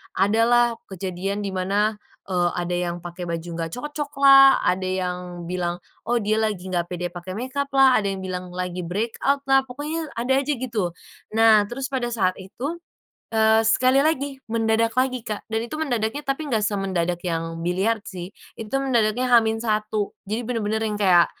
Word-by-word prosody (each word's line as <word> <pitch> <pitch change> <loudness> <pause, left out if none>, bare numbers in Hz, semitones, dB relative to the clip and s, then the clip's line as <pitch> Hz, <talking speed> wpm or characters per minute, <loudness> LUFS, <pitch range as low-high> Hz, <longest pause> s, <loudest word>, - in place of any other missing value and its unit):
Ada 210 +3 +3
lah 240 0 +5 0.2
kejadian 190 +2 -4
di 200 - -3
mana, 200 +3 0 0.3
eee, 175 -2 +2
ada 175 0 -2
yang 170 - -3
pakai 175 0 -6
baju 170 0 -4
enggak 165 -1 -3
cocoklah, 275 -1 +5
ada 185 +1 +1
yang 180 -1 -3
bilang, 175 -1 -2 0.3
oh, 240 - +2
dia 215 +1 +1
lagi 205 -4 -2
enggak 175 -1 0
pede 180 0 -4
pakai 180 +1 -7
makeuplah, 270 +2 +3
ada 205 - -2
yang 195 -1 -3
bilang 185 -1 -4
lagi 180 0 -4
breakout-lah, 270 +8 +1
pokoknya 300 +5 -4
ada 245 +3 +1
aja, 285 +2 0
gitu. 225 -8 -2 0.4
Nah, 220 -2 +6
terus 265 +4 -5
pada 255 -3 -1
saat 185 -5 +1
itu, 260 - -5 0.6
eee, 220 0 +5
sekali 255 +4 +4
lagi, 285 -3 0
mendadak 225 0 +1
lagi, 255 -2 0
Kak, 210 -1 -5
dan 220 0 0
itu 240 - -8
mendadaknya, 245 -2 -1
tapi 280 +2 -2
enggak 225 -6 0
semendadak 185 -4 -1
yang 165 -1 -2
biliard, 200 +5 0
sih. 180 -1 -7 0.2
Itu 225 +4 -3
mendadaknya 245 -2 +1
H-1, 220 -2 +2
jadi 220 +4 -2
bener-bener 220 -2 -1
yang 210 - -2
kayak, 180 -4 +6
215 Hz, 165 wpm, -23 LUFS, 185-255 Hz, 0.6 s, Nah